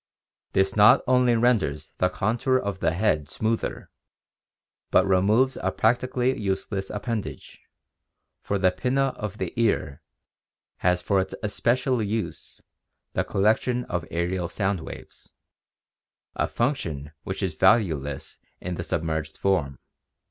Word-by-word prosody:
This 95 0 +2
not 110 +5 +7
only 125 -1 +4
renders 105 - +1
the 90 - +3
contour 115 +7 +1
of 100 -6 -3
the - - +2
head 80 -6 +1
smoother, 110 +6 -2 1.0
but - - +4
removes 105 +8 +3
a - - 0
practically 125 +2 +1
useless 95 0 -2
appendage, 110 0 -5 0.8
for 100 - -1
the 95 -1 +3
pinna 130 +9 +1
of 105 -6 -6
the 95 -3 -4
ear 85 -10 0 0.8
has 90 0 +1
for 100 0 +2
its 95 - -2
especial 125 +4 +1
use 110 +1 -4 0.5
the - - +1
collection 110 +5 +1
of 90 -2 -3
aerial 85 +1 -1
sound 100 -2 -1
waves, 80 - -11 1.0
a - - 0
function 85 - -2
which - - -4
is - - -1
valueless 75 - +1 0.2
in 90 -1 -5
a - - -4
submerged 80 -1 -3
form. 70 -9 0
100 Hz, 125 wpm, -25 LUFS, 90-120 Hz, 1.0 s, not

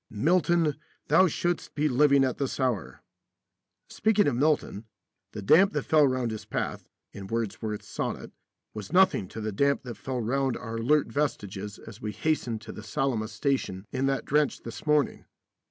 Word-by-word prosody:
Milton, 165 - +2 0.3
thou 190 - +6
shouldst 175 +1 -2
be 150 +1 +2
living 140 0 +4
at 130 -2 -1
this 140 -1 -2
hour. 125 -6 -2 0.8
Speaking 215 -2 +2
of 140 - +1
Milton, 140 -6 0 0.5
the 105 - -7
damp 190 - +5
that 150 - -1
fell 155 -2 +4
round 130 -3 -1
his 110 - -6
path - - -4 0.2
(in 100 -1 -8
Wordsworth's 110 -1 -3
sonnet) - - -4 0.4
was 105 +2 -7
nothing 180 - +4
to 110 - -8
the 110 0 -3
damp 140 +7 +1
that 120 -4 -7
fell 125 +4 -4
round 130 +3 0
our 115 -1 -6
alert 145 +6 +2
vestiges 105 -8 -3
as 115 +1 -12
we 105 -2 -4
hastened 125 -8 -1
to - - -9
the - - -9
Salamis 110 0 -2
station 110 -6 -1
in 135 +1 0
that 135 0 -1
drench 150 0 +1
this 115 +6 -9
morning. 150 -3 +1
130 Hz, 170 wpm, -27 LUFS, 110-150 Hz, 0.8 s, thou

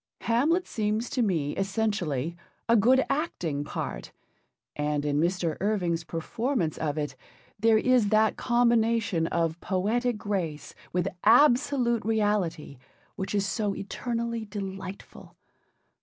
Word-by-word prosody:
Hamlet 300 +11 +2
seems 215 +1 -2
to 260 - 0
me 165 -10 0
essentially 195 - -1 0.3
a 230 - +5
good 250 +5 +4
acting 180 - -2
part, - - -5 0.6
and 150 0 -1
in 145 0 +1
Mr. 170 -1 0
Irving's 180 -5 0
performance 165 - -2
of 150 -1 -2
it 145 -3 -3 0.4
there 225 +1 +5
is 245 -3 +3
that 215 0 +3
combination 230 -7 +2
of 165 0 -1
poetic 220 +5 0
grace 185 -8 -3 0.2
with 180 +1 0 0.2
absolute 245 0 +4
reality 205 - -1 0.4
which 195 0 -3
is 200 -1 +1
so 205 -1 -1
eternally 235 +2 -3
delightful. 195 -2 -8
205 Hz, 115 wpm, -27 LUFS, 170-235 Hz, 0.6 s, a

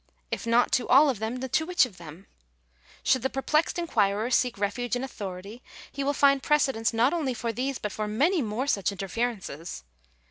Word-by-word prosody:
If - - -3
not 235 +1 +3
to 255 - +1
all 280 +2 +6
of 235 - -7
them, 225 +3 -3
to 260 +4 0
which 355 -3 +3
of 210 -8 -12
them? 170 +3 -11 0.8
Should 260 - +3
the 265 - 0
perplexed 300 +6 0
inquirer 220 - 0
seek 250 -3 +2
refuge 210 +4 -1
in 245 - -3
authority, 200 -2 -7 0.3
he 280 - -4
will 280 - +1
find 275 -1 +4
precedents 270 -7 +1
not 235 +5 +2
only 290 -7 -1
for 230 0 -3
these 265 +3 -2
but 210 - -4
for 215 +2 -3
many 295 - +2
more 225 +2 -2
such 200 -9 0
interferences. 195 - -4
245 Hz, 185 wpm, -27 LUFS, 210-270 Hz, 0.8 s, all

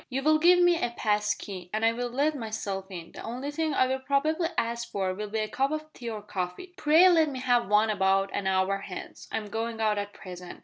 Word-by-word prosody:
You 270 +1 -2
will 310 +1 +4
give 350 +3 +6
me 350 -1 +4
a 240 - +1
pass 210 -1 +1
key, 185 -3 -8
and 220 +1 0
I 225 - +5
will 245 +1 -3
let 285 +5 +1
myself 205 -5 -4
in. 175 -3 -8
The - - -10
only 255 +5 -5
thing 310 -1 -1
I - - +4
will 260 +1 -1
probably 295 +5 +1
ask 235 +1 -1
for 190 -2 -1
will 210 +2 -5
be 220 - -3
a 215 - -1
cup 265 +5 0
of 310 0 -5
tea 240 -2 -6
or 215 -2 -6
coffee. 190 - -5
Pray 330 +1 +6
let 325 -4 +4
me 270 - -5
have 245 -3 +2
one 210 +2 +3
about 195 -1 +2
an 195 - -2
hour 190 +1 +1
hence. 195 -2 -8
I'm 215 -2 -3
going 225 +1 -3
out 215 -2 +1
at 205 0 -4
present. 180 -2 -10
225 Hz, 245 wpm, -28 LUFS, 200-285 Hz, -, give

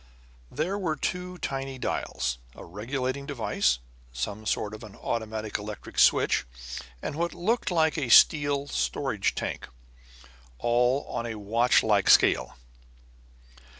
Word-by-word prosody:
There 185 +7 -2
were 165 -5 -1
two 180 +4 -3
tiny 135 -4 -4
dials, 65 - -2 0.2
a - - -10
regulating 130 +8 -4
device, 110 - +1 0.3
some 100 - -4
sort 105 0 -1
of 110 - -9
an 105 -2 -11
automatic 110 -2 -3
electric 105 0 -6
switch, - - +4 0.6
and - - -3
what 170 +2 -2
looked 225 +7 0
like 160 -2 +2
a 130 -5 -2
steel 145 +1 +5
storage 60 - -1
tank; - - -4 0.9
all 125 - +2
on 120 - -3
a 115 - -4
watchlike 105 -1 +3
scale. - - +4
125 Hz, 120 wpm, -27 LUFS, 105-150 Hz, 0.9 s, steel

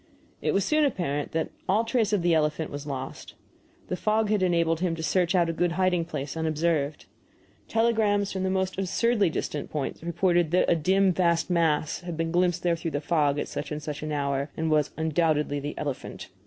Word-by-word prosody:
It - - 0
was 195 - +2
soon 310 0 +3
apparent 170 - -1
that 160 0 -1 0.2
all 210 +4 +3
trace 230 -2 +1
of 205 -5 +1
the 175 -1 +3
elephant 155 0 0
was 145 +1 -6
lost. 135 -2 -6 0.5
The - - -2
fog 215 +2 +1
had 210 -2 +2
enabled 170 -3 +2
him 175 -2 0
to 160 - -6
search 180 +2 +1
out 175 -2 +3
a 165 - -1
good 175 +1 0
hiding 180 -2 +1
place 145 -3 -5
unobserved. 155 -2 -1 0.6
Telegrams 220 -3 +2
from 190 - -3
the 190 - 0
most 190 0 -1
absurdly 205 +1 +2
distant 150 -2 -4
points 145 -3 -4
reported 175 0 +1
that 180 +3 +3
a - - +4
dim 190 +4 +3
vast 170 0 +1
mass 160 -3 +1
had 175 -2 -6
been 165 0 -1
glimpsed 175 0 +1
there 175 -1 +2
through 165 0 -4
the 145 - -2
fog 150 -2 +1
at - - -2
such 150 - -5
and 150 0 -4
such 150 0 -5
an 155 0 -4
hour, 140 -1 -1
and 160 0 0
was 150 -2 +3
"undoubtedly 155 -2 +1
the 145 +1 -5
elephant." 140 -3 -5
170 Hz, 205 wpm, -27 LUFS, 150-185 Hz, 0.6 s, a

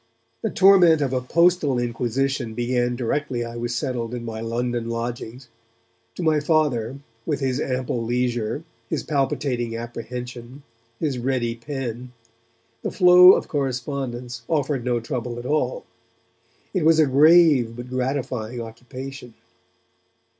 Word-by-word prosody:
The 220 - -1
torment 185 -6 +6
of 135 -3 -1
a 130 - 0
postal 170 0 +2
inquisition 120 0 -1
began 120 0 0
directly 125 0 -2
I 115 0 -8
was 120 0 -3
settled 125 -3 -3
in 120 -1 -6
my 110 -1 -5
London 120 0 -2
lodgings. 120 +1 -5 0.7
To 180 - -4
my 155 -2 +3
Father 145 -6 0 0.3
with 145 0 -2
his 130 -1 -1
ample 125 -2 -2
leisure, 120 +2 -1 0.3
his - - -2
palpitating 130 -5 -1
apprehension, 120 +2 -7 0.4
his 140 -5 -1
ready 120 -2 -1
pen 125 -1 -6 0.7
the - - -2
flow 180 0 +8
of - - -1
correspondence 125 -3 -3
offered 145 -5 0
no 120 -1 0
trouble 120 0 -4
at 120 - -7
all; 155 - -1 0.9
it 185 -5 0
was 160 0 +5
a 155 - +5
grave 145 -4 +5
but 120 +1 -8
gratifying 125 -3 -2
occupation. 125 +2 -9
125 Hz, 130 wpm, -23 LUFS, 120-145 Hz, 0.9 s, flow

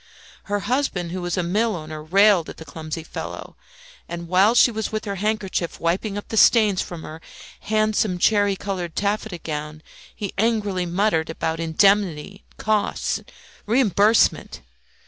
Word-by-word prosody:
Her 205 0 -2
husband, 235 -10 -1
who 185 +1 -4
was 175 0 -2
a 180 - +1
millowner, 170 -5 -2
railed 190 +2 +4
at - - -9
the 160 - -10
clumsy 155 +2 -6
fellow, - - -7 0.5
and 170 0 -6
while 190 +6 +4
she 245 - +6
was 220 -1 -3
with 215 0 -3
her 200 -1 -4
handkerchief 195 -4 -2
wiping 195 +5 -1
up 205 - -7
the 220 - -3
stains 210 -4 +5
from 170 -2 -7
her 160 +1 -9 0.4
handsome 215 -3 0
cherry 205 +1 +3
coloured 185 -4 -5
taffeta 205 -1 -1
gown, 155 -1 -6 0.3
he 200 -3 -5
angrily 205 -5 0
muttered 175 -2 +1
about 160 0 -3
indemnity, 195 +1 +1
costs, 215 -1 -1 0.5
reimbursement. 220 -2 +2
195 Hz, 145 wpm, -22 LUFS, 170-215 Hz, 0.5 s, she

